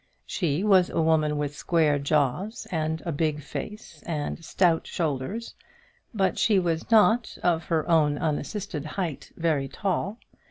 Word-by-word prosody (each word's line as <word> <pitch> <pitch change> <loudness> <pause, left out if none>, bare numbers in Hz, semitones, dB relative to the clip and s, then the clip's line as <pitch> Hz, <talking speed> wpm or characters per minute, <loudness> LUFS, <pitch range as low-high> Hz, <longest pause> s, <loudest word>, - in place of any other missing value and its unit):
She 170 -1 -1
was 190 -4 +5
a - - -2
woman 155 -2 +2
with 145 0 -2
square 155 -4 +2
jaws, 150 - 0
and 160 -1 -1
a 170 - -1
big 150 -1 -1
face, 210 0 -7
and 160 0 -3
stout 165 0 +2
shoulders: 160 - -3 0.6
but 195 -4 0
she 210 -3 +4
was 170 -2 0
not, 225 +1 +4
of 165 -2 +2
her 160 -2 0
own 155 -4 +3
unassisted 160 +2 -3
height, 170 -7 -3
very 155 -5 +1
tall. 195 - -2
165 Hz, 145 wpm, -26 LUFS, 150-190 Hz, 0.6 s, was